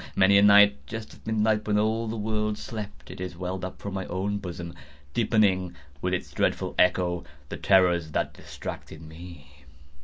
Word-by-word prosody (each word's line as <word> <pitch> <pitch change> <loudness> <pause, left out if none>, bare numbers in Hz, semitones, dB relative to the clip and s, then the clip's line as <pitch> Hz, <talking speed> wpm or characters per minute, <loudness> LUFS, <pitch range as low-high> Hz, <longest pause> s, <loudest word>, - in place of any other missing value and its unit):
Many 100 +1 +6
a - - +5
night, 100 -7 +6
just 110 -1 -7
at - - -17
midnight, 110 -1 +1
when 105 -1 +2
all 110 +2 +1
the 110 - -3
world 105 0 -1
slept, 100 - -7
it - - -10
has 90 -2 -5
welled 90 +1 -4
up 95 - -6
from 100 - -6
my 95 -1 -4
own 100 +3 -2
bosom, 85 -3 -7 0.4
deepening, 100 -6 +2 0.3
with 90 - -1
its - - -6
dreadful - - 0
echo, 90 -1 +2 0.3
the - - -5
terrors 90 -4 +3
that - - -1
distracted 80 0 -8
me. 80 -4 -13
95 Hz, 175 wpm, -26 LUFS, 90-105 Hz, 0.4 s, Many